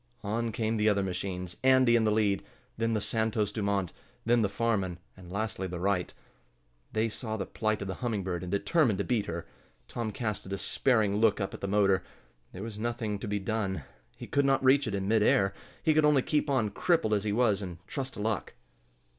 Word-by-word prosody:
On 115 +3 -1
came 110 0 -1
the 105 0 +3
other 100 -1 +2
machines, 90 -1 -4
Andy 130 -2 +5
in 115 -1 +3
the 105 - +3
lead, 105 -2 +2 0.3
then 115 0 0
the 110 - +1
Santos 110 -1 0
Dumont, 100 -4 -1 0.3
then 120 +1 +4
the 100 - +2
Farman, 100 -4 0 0.2
and 90 -2 -12
lastly 100 -1 -2
the 90 -1 -5
Wright. 95 -1 0 0.8
They 110 +1 +1
saw 110 0 -4
the - - -3
plight 110 -2 -1
of - - -6
the 95 - -2
Humming 110 -1 -2
Bird 90 -2 -3
and 90 - -5
determined 115 - +2
to 100 - 0
beat 115 -3 0
her. 85 0 -4 0.4
Tom 115 -2 -3
cast 110 -3 -3
a - - -8
despairing 105 +1 +1
look 115 +1 +3
up 95 - -2
at - - -8
the 100 - -2
motor. 100 -2 +3 0.5
There 95 - -7
was 110 -2 -6
nothing 115 -3 -2
to 105 - -5
be 105 0 0
done. 95 -5 -2 0.3
He - - -7
could 140 - +1
not 135 -1 +2
reach 135 +2 +5
it 100 - -1
in 95 -1 -2
mid 110 +1 +3
air. 95 -2 +3 0.3
He 155 - +4
could 155 0 +4
only 150 -3 +4
keep 150 -1 0
on, 120 -7 +1
crippled 160 - +2
as 100 -1 +1
he 105 - -1
was, 105 -2 +2
and 90 -3 -6
trust 135 +4 -4
to - - -5
luck. 110 -2 -2
105 Hz, 215 wpm, -29 LUFS, 100-115 Hz, 0.8 s, Andy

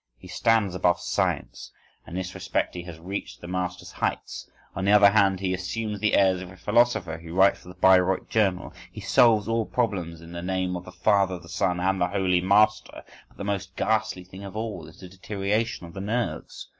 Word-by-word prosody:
He - - -14
stands 110 -5 +1
above 90 -1 +2
science, - - -2 0.4
and 85 - -8
in 95 - -1
this 90 - -8
respect - - -2
he 90 - -5
has 85 -3 -9
reached 95 +3 -6
the 85 - -10
master's 90 0 -4
heights. - - -4 0.3
On 95 - -3
the 100 - +3
other 105 -1 +7
hand, 100 -3 +3
he 95 -1 0
assumes 105 +3 -3
the 105 0 +2
airs 95 -2 +3
of 90 - -8
a 95 - -14
philosopher, 105 -6 +1
he 85 0 -12
writes 95 +3 +4
for - - -18
the 90 - -11
Bayreuth 95 0 +4
Journal; 95 -5 0 0.2
he - - -9
solves 110 -3 +4
all 115 -1 0
problems 90 -9 -2
in 85 0 -12
the 85 0 -6
name 90 0 -1
of 90 0 -6
the 90 - -10
Father, 95 0 +2
the 85 -1 -14
Son, 90 0 0
and 95 +1 0
the 90 - +3
Holy 90 -2 +1
Master. 105 +3 +2 0.2
But - - -26
the - - -6
most 100 -2 -3
ghastly 110 -4 0
thing 95 +2 -12
of 100 0 -9
all 110 -7 -5
is 80 +1 -16
the 95 - -9
deterioration 100 +3 -2
of 85 - -12
the 95 - -6
nerves. 115 +4 -3
95 Hz, 215 wpm, -25 LUFS, 90-105 Hz, 0.4 s, other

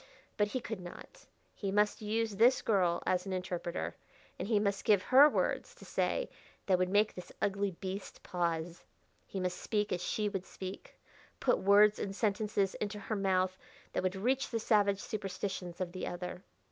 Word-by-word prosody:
But 210 -1 +2
he 255 +5 -2
could 225 -4 -5
not. 175 -1 -11 0.3
He 200 -2 -3
must 210 +2 +2
use 215 -1 -1
this 240 +4 +5
girl 180 -5 +2
as 185 +1 +1
an 190 - -2
interpreter, 180 -2 -3 0.4
and - - -3
he 220 -1 +3
must 200 -1 0
give 205 -4 +4
her 275 +3 +8
words - - -1
to - - -14
say - - 0 0.4
that 185 -2 +3
would 185 0 +1
make 205 +2 +3
this 180 -1 -9
ugly 200 0 +1
beast 190 +2 -7
pause. 170 -1 -2 0.4
He 195 - -4
must 180 -1 -2
speak 210 -1 0
as 180 - -2
she 210 +2 0
would 195 -2 -4
speak; 190 0 -8 0.4
put - - +2
words 205 +2 +6
and 195 -1 -3
sentences 205 -2 0
into 210 0 -2
her 210 +2 -3
mouth 185 -2 +1 0.4
that - - 0
would 185 +1 -1
reach 255 +7 0
the 230 - -1
savage 205 -3 +3
superstitions 190 -4 -4
of 180 -2 -2
the 185 - -4
other. 180 +1 -5
195 Hz, 180 wpm, -33 LUFS, 185-210 Hz, 0.4 s, her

